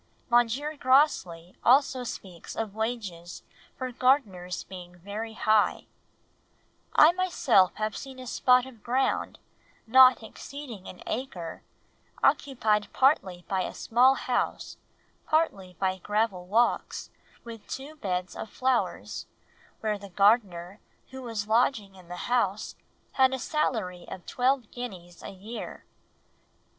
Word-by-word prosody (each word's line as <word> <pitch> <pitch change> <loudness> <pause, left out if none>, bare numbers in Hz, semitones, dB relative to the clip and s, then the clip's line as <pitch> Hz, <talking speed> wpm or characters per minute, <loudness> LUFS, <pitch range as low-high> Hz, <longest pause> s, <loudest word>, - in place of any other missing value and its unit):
M. 240 0 +6 0.3
Grosley 220 - +2
also 260 0 +4
speaks 185 -7 -8
of 220 -3 -3
wages 210 -7 -4 0.3
for 255 -1 -4
gardeners 225 - +1
being 180 -1 -11
very 210 +5 -6
high: 215 -1 +2 1.1
"I - - +9
have 345 - 0
myself 275 - +3 0.2
seen 265 -1 -8
a 255 - -9
spot 250 +1 +3
of 245 -5 -13
ground, 255 +4 0 0.5
not 255 +1 +7
exceeding 245 -4 -9
an 180 - -10
acre, 180 -10 -5 0.6
occupied 215 -7 +2
partly 190 - +2
by 190 -1 0
a - - -4
small 255 +4 +4
house, 250 -2 -2 0.5
partly 195 - 0
by 190 0 -1
gravel 205 -2 -1
walks, 230 +5 0 0.3
with 230 -2 -10
two 280 +4 -7
beds 185 - -3
of 220 - -6
flowers, 255 +1 -1 0.5
where 215 -2 -1
the 200 0 -10
gardener, 195 -2 +2 0.3
who 265 0 -8
was 225 -4 -4
lodging 220 -3 +2
in 185 -2 -16
the 180 0 -6
house, 215 -4 0 0.4
had 265 0 +3
a - - -4
salary 220 - -2
of 185 - -8
twelve 255 -2 0
guineas 185 -8 -8
a - - -7
year." 205 +5 -8
220 Hz, 125 wpm, -28 LUFS, 185-255 Hz, 1.1 s, I